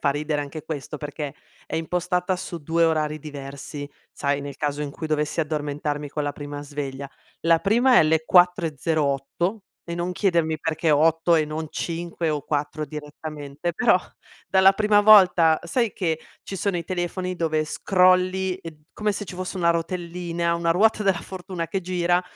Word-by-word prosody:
fa - - +1
ridere 150 +1 -1
anche 145 +1 -6
questo 150 -1 -5
perché 145 -1 -5 0.3
è - - -3
impostata 180 +2 0
su 180 -1 -6
2 165 +3 +1
orari 155 -1 +1
diversi, 145 0 -7 0.2
sai, 140 0 -1
nel 140 -1 -7
caso 145 -1 -2
in 145 -1 -3
cui 160 +2 -6
dovessi 150 +1 -1
addormentarmi 150 -1 -2
con 150 +1 -3
la 145 - -2
prima 145 0 -7
sveglia. 140 -1 -5 0.3
La 165 0 +4
prima 240 +7 +3
è - - +9
alle 160 0 +3
4.08 165 +1 +1 0.2
e 170 - -5
non 175 +1 -2
chiedermi 170 -5 +1
perché 160 0 0
8 165 +3 +4
e 155 -1 +3
non 155 +1 -4
5 170 0 -3
o 150 -2 -2
4 150 +1 -2
direttamente, 150 +1 -6
però 230 -1 +4 0.5
dalla 190 0 +6
prima 210 0 +3
volta, 185 -6 +7
sai 230 +5 0
che 160 -4 -1 0.2
ci 195 - -6
sono 195 -1 -1
i 170 - -3
telefoni 180 +1 -3
dove 160 -2 0
scrolli 185 +2 +2
e 165 -3 -8
d 150 -1 -21
come 210 0 -1
se 205 0 -3
ci 185 - -8
fosse 185 +1 -5
una 170 -2 +3
rotellina, 170 0 -2
una 170 0 0
ruota 215 +4 +3
della 195 -3 +2
fortuna 180 -2 -6
che 195 - -2
gira 175 0 +1
165 Hz, 170 wpm, -24 LUFS, 150-180 Hz, 0.5 s, è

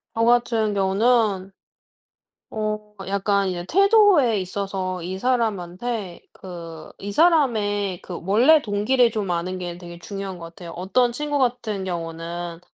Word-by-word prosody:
저 225 - +1
같은 235 -3 +2
경우는 200 0 +2 1.0
어 215 -1 -4
약간 200 0 +1
이제 175 -2 -3
태도에 390 - +5
있어서 185 -1 -3
이 185 +2 -5
사람한테 215 -4 -2
그 170 -3 -10
이 205 - -6
사람의 210 - +2
그 175 - -7
원래 245 +11 +5
동기를 230 +4 +2
좀 210 -4 -3
아는 175 +2 -2
게 175 -1 -5
되게 175 -1 -10
중요한 195 0 -6
것 165 - -8
같아요. 170 +1 -10
어떤 220 +8 +1
친구 295 +3 -2
같은 240 -6 -1
경우는 170 -1 -5
200 Hz, 260 characters per minute, -23 LUFS, 180-235 Hz, 1.0 s, 태도에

